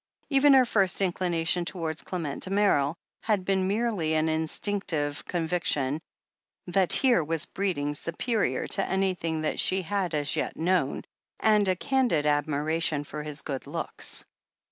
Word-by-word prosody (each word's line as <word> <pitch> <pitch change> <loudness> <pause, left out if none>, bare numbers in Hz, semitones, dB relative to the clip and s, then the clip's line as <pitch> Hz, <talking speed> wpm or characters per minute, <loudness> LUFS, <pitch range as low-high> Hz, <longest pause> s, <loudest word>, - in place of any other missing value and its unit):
Even 275 +1 +6
her 260 -1 +6
first 195 -5 +1
inclination 175 -2 0
towards 165 -3 -3
Clement 165 -6 -4
Damerel 185 -7 +2 0.3
had 205 -4 0
been 190 -1 +1
merely 200 -7 0
an 155 +1 +2
instinc 160 +6 -1
tive 145 -3 -2
conviction 160 -4 0 0.6
that 185 0 +1
here 250 - +4
was 160 +1 -1
breeding 170 -7 -2
superior 165 - -1
to 195 - +1
any 190 0 +1
thing 160 -3 -3
that 155 - -2
she 190 0 +1
had 185 -3 -1
as 145 -1 0
yet - - -2
known, 165 -4 0 0.4
and 210 -2 +3
a 185 - +2
candid 245 - +1
admira 150 +2 0
tion 150 -3 +1
for 150 +1 -7
his 150 0 -3
good 135 -3 -5
looks. - - -4
170 Hz, 150 wpm, -27 LUFS, 155-195 Hz, 0.6 s, Even